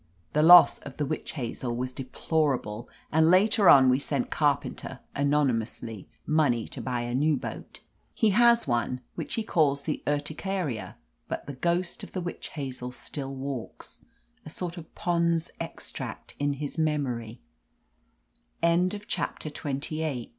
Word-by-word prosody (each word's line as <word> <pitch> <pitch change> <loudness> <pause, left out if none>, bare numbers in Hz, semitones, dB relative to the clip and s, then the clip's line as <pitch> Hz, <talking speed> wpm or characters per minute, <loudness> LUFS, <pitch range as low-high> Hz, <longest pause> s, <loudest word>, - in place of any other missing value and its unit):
(The 150 - +3
loss 175 +2 +9
of 140 -2 -10
the 150 - 0
Witch 155 +3 -4
Hazel 120 -3 -3
was 125 +1 -3
deplor 140 +2 0
able, 105 +2 -8 0.2
and 160 +1 +4
later 200 +2 +5
on 135 -2 +8
we 130 +1 +4
sent 140 -2 -2
Carpenter, 140 -2 0 0.2
anony 140 -1 +3
mously, 115 -2 -6 0.2
money 145 -7 +2
to - - -6
buy 125 -2 -2
a 120 0 -3
new 150 +3 +2
boat. - - -8 0.3
He 220 -3 +3
has 235 0 +5
one, 125 +1 0
which - - -4
he 225 - -1
calls 145 -8 +2
the 150 - -2
Urticaria, 145 - -2 0.3
but - - -4
the 145 - -6
ghost 170 +6 -1
of - - -10
the 185 - -2
Witch 175 0 -6
Hazel 130 -4 -5
still 135 +1 -6
walks, 135 -3 -7 0.4
a - - -9
sort 170 +2 -5
of 165 -3 -10
Pond's 170 -2 +1
Extract - - -6
in 145 0 +1
his 145 +3 -5
memor 145 -6 0
145 Hz, 140 wpm, -27 LUFS, 130-165 Hz, 0.4 s, loss